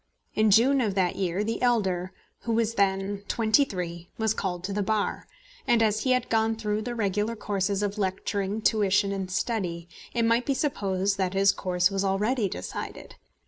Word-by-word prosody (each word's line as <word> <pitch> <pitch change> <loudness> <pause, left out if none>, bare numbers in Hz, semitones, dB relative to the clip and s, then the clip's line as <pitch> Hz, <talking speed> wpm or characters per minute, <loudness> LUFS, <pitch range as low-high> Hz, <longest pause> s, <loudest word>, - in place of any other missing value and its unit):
In 215 0 +3
June 255 +7 +5
of 210 -5 -1
that 185 -3 +1
year 185 +1 -1
the 225 +1 -3
elder, 190 -7 +1 0.3
who 230 - -2
was 230 0 +1
then 195 -1 0
twenty 225 +4 +3
three, 175 -6 -5
was 220 -1 +1
called 180 -4 -3
to 195 +1 -3
the 205 - 0
Bar; 210 +1 -1 0.4
and 230 -1 +4
as 215 -1 +2
he 260 - +1
had 255 -1 0
gone 225 0 +1
through 210 -1 -2
the 240 +2 -4
regular 210 +1 -1
courses 200 -1 -1
of 205 +1 -2
lecturing 200 +2 -2
tuition 200 -2 +2
and 195 -2 -3
study, 185 -4 -2 0.2
it 235 -1 +1
might 230 +2 +2
be 275 - +1
supposed 200 -8 -1
that 190 0 0
his 195 0 +5
course 180 0 +1
was 195 0 -1
already 205 +3 +1
decided. 90 - -6
205 Hz, 185 wpm, -27 LUFS, 190-225 Hz, 0.4 s, June